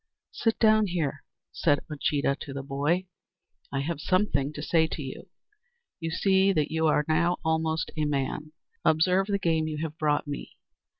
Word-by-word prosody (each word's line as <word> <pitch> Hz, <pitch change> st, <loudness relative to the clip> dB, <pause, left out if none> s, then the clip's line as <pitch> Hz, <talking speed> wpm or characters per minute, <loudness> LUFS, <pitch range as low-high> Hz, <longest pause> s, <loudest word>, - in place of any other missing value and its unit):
"Sit 225 Hz, -1 st, 0 dB
down 215 Hz, -1 st, +4 dB
here," 155 Hz, -6 st, -2 dB, 0.3 s
said 145 Hz, -3 st, +2 dB
Uncheedah 145 Hz, -2 st, 0 dB
to 140 Hz, -, -7 dB
the 135 Hz, 0 st, -5 dB
boy; 145 Hz, +7 st, 0 dB, 0.7 s
"I 135 Hz, -, -1 dB
have 150 Hz, +1 st, -3 dB
something 150 Hz, -8 st, +1 dB
to 150 Hz, -, -6 dB
say 160 Hz, +1 st, +3 dB
to 160 Hz, -, -5 dB
you. 135 Hz, +8 st, -8 dB, 0.7 s
You 165 Hz, -1 st, -3 dB
see 190 Hz, +3 st, +3 dB
that 155 Hz, -4 st, 0 dB
you 160 Hz, 0 st, +2 dB
are 150 Hz, -1 st, +2 dB
now 170 Hz, +3 st, +2 dB
almost 160 Hz, 0 st, 0 dB
a 155 Hz, -1 st, 0 dB
man. 150 Hz, +1 st, -2 dB, 0.3 s
Observe 180 Hz, +5 st, +3 dB
the 200 Hz, -1 st, +1 dB
game 160 Hz, -4 st, +1 dB
you 155 Hz, -1 st, -3 dB
have 160 Hz, -1 st, -5 dB
brought 150 Hz, -1 st, +1 dB
me! 145 Hz, -1 st, -7 dB
160 Hz, 170 wpm, -27 LUFS, 145-175 Hz, 0.7 s, down